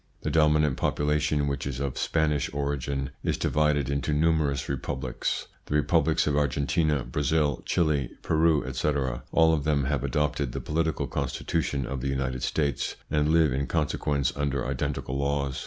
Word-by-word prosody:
The -, -, -2 dB
dominant 75 Hz, -3 st, +3 dB
population, 75 Hz, 0 st, +1 dB
which 70 Hz, 0 st, -2 dB
is 65 Hz, -2 st, -4 dB
of 70 Hz, -2 st, -2 dB
Spanish 75 Hz, -3 st, 0 dB
origin, 70 Hz, -1 st, -2 dB
is -, -, 0 dB
divided 75 Hz, -1 st, +1 dB
into 70 Hz, +1 st, -1 dB
numerous 75 Hz, -3 st, +1 dB
republics: 65 Hz, -1 st, -3 dB, 0.2 s
the 75 Hz, -, -1 dB
republics 80 Hz, +1 st, +2 dB
of 75 Hz, -, +1 dB
Argentina, 70 Hz, 0 st, +1 dB
Brazil, 75 Hz, 0 st, 0 dB
Chili, 75 Hz, -6 st, +1 dB
Peru, 80 Hz, -2 st, +2 dB
etc. 65 Hz, -2 st, -1 dB
All 80 Hz, 0 st, +5 dB
of 75 Hz, -3 st, 0 dB
them 75 Hz, -2 st, +1 dB
have 70 Hz, -1 st, -1 dB
adopted 75 Hz, -3 st, 0 dB
the -, -, -3 dB
political 80 Hz, 0 st, -1 dB
constitution 70 Hz, -5 st, -2 dB
of 70 Hz, 0 st, -4 dB
the 70 Hz, -, -2 dB
United 65 Hz, -2 st, -2 dB
States, 70 Hz, 0 st, -1 dB, 0.2 s
and 75 Hz, 0 st, +2 dB
live 80 Hz, -4 st, +4 dB
in 70 Hz, +2 st, -1 dB
consequence 75 Hz, -3 st, 0 dB
under 70 Hz, -2 st, -1 dB
identical 65 Hz, 0 st, -2 dB
laws. 70 Hz, -1 st, -1 dB
70 Hz, 155 wpm, -27 LUFS, 70-75 Hz, 0.2 s, All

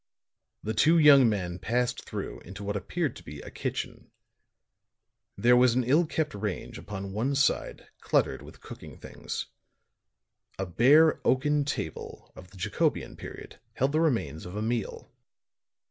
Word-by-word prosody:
The 110 Hz, -, -2 dB
two 155 Hz, +10 st, +4 dB
young 140 Hz, -6 st, +7 dB
men 90 Hz, -4 st, -3 dB
passed 125 Hz, +1 st, -1 dB
through -, -, -5 dB
into 100 Hz, +3 st, -10 dB
what 100 Hz, +1 st, -3 dB
appeared 130 Hz, -, -2 dB
to -, -, -13 dB
be 75 Hz, 0 st, -9 dB
a -, -, -10 dB
kitchen. -, -, -5 dB, 1.3 s
There 125 Hz, +1 st, +5 dB
was 125 Hz, -1 st, +4 dB
an 130 Hz, -, +2 dB
ill 150 Hz, +8 st, +3 dB
kept 155 Hz, -1 st, -2 dB
range 100 Hz, -2 st, -5 dB
upon 95 Hz, -1 st, -7 dB
one 125 Hz, +7 st, -1 dB
side 135 Hz, 0 st, 0 dB
cluttered -, -, +1 dB
with -, -, -14 dB
cooking -, -, -11 dB
things. -, -, -6 dB, 1.1 s
A 95 Hz, -, -2 dB
bare 140 Hz, -, +5 dB
oaken 145 Hz, +2 st, +2 dB
table 80 Hz, -, -5 dB
of 90 Hz, -, -13 dB
the 95 Hz, -, -16 dB
Jacobean 90 Hz, -, -1 dB
period -, -, -10 dB
held 135 Hz, +2 st, 0 dB
the 155 Hz, +2 st, +1 dB
remains 95 Hz, -, 0 dB
of 90 Hz, -, -9 dB
a 105 Hz, -, -2 dB
meal. 115 Hz, -1 st, -3 dB
120 Hz, 150 wpm, -28 LUFS, 100-140 Hz, 1.3 s, young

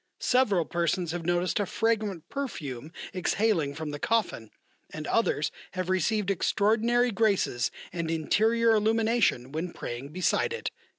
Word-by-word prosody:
Several 205 Hz, -10 st, +2 dB
persons 170 Hz, 0 st, -1 dB
have 170 Hz, -1 st, -4 dB
noticed 175 Hz, +2 st, +1 dB
a 205 Hz, -, 0 dB
fragrant 215 Hz, -7 st, -1 dB
perfume 155 Hz, -, -5 dB, 0.2 s
exhaling 185 Hz, -6 st, +1 dB
from 160 Hz, -1 st, -4 dB
the 145 Hz, -, -6 dB
coffin, 210 Hz, -, 0 dB, 0.4 s
and -, -, -6 dB
others -, -, +1 dB, 0.2 s
have 185 Hz, 0 st, -2 dB
received 200 Hz, +2 st, +1 dB
extraordinary 225 Hz, +5 st, +2 dB
graces 200 Hz, -, +1 dB, 0.2 s
and 170 Hz, -2 st, -2 dB
interior 220 Hz, +8 st, +2 dB
illumination 220 Hz, -, +2 dB
when 165 Hz, +3 st, -4 dB
praying 120 Hz, +4 st, -6 dB
beside 185 Hz, -, 0 dB
it." 470 Hz, -, -4 dB
185 Hz, 130 wpm, -28 LUFS, 160-225 Hz, 0.4 s, Several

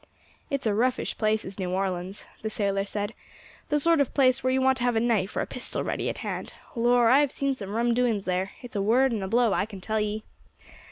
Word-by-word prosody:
"It's 275 Hz, -2 st, -2 dB
a 215 Hz, -, +2 dB
roughish 245 Hz, +4 st, 0 dB
place 215 Hz, 0 st, 0 dB
is 190 Hz, +2 st, -8 dB
New 185 Hz, -1 st, -2 dB
Orleans," 185 Hz, 0 st, -2 dB, 0.2 s
the 220 Hz, -, -2 dB
sailor 200 Hz, -2 st, 0 dB
said; 205 Hz, +1 st, -3 dB, 0.6 s
"the 295 Hz, -, +2 dB
sort 330 Hz, 0 st, +4 dB
of 275 Hz, -, -1 dB
place 265 Hz, -1 st, +3 dB
where 255 Hz, -, +2 dB
you 260 Hz, -, +2 dB
want 265 Hz, 0 st, +3 dB
to -, -, -2 dB
have 245 Hz, -1 st, +2 dB
a -, -, +3 dB
knife 225 Hz, -5 st, +1 dB
or -, -, 0 dB
pistol -, -, -3 dB
ready -, -, -2 dB
at -, -, -4 dB
hand. -, -, -4 dB, 0.2 s
Lor', 240 Hz, 0 st, +4 dB
I 270 Hz, -, +7 dB
have 290 Hz, -2 st, +2 dB
seen 275 Hz, -1 st, 0 dB
some 205 Hz, -5 st, -6 dB
rum 235 Hz, +1 st, +2 dB
doings 230 Hz, -5 st, +1 dB
there; 185 Hz, +1 st, 0 dB
it's 245 Hz, -1 st, -10 dB
a 200 Hz, -, +1 dB
word 245 Hz, +6 st, +3 dB
and 220 Hz, -3 st, -2 dB
a 190 Hz, -, -3 dB
blow, 230 Hz, +1 st, +3 dB
I 200 Hz, -, 0 dB
can 200 Hz, -3 st, -9 dB
tell 220 Hz, +3 st, -1 dB
ye." 210 Hz, +1 st, -2 dB
225 Hz, 240 wpm, -27 LUFS, 200-255 Hz, 0.6 s, I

